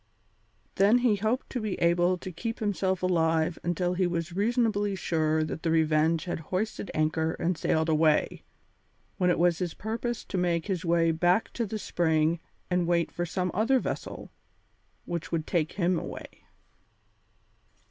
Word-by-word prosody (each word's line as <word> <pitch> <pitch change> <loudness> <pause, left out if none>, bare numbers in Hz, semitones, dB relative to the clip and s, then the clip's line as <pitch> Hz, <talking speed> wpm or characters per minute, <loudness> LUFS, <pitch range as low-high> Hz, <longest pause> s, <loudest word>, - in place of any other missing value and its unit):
Then 205 +5 +5
he 240 -4 +2
hoped 220 +6 -1
to 250 - -2
be 215 -3 -2
able 175 +2 +3
to 185 - -7
keep 225 +7 -4
himself 190 -3 -1
alive 165 -2 +1
until 175 +1 -1
he 180 0 +1
was 170 0 -3
reasonably 205 -1 +1
sure 160 -3 0
that 155 +1 -5
the 165 - -1
Revenge 160 0 +2
had 175 - -3
hoisted 205 +2 -2
anchor 160 +1 +1
and 180 +2 -1
sailed 160 0 0
away, 155 -1 +2 0.8
when 180 -1 +3
it 175 - +2
was 170 -1 +2
his 175 -3 -3
purpose 230 +2 -4
to 190 - -3
make 170 -2 0
his 190 -3 -2
way 165 -1 +3
back 175 +6 +1
to 230 -2 -2
the 215 - -4
spring 160 -4 +1 0.3
and 180 -2 0
wait 170 -1 +1
for 175 0 -3
some 180 +1 -2
other 230 +7 +3
vessel - - -5 0.7
which 170 0 -4
would 165 -2 -1
take 160 -3 0
him 180 -2 +1
away. - - -9
175 Hz, 160 wpm, -28 LUFS, 165-200 Hz, 0.8 s, Then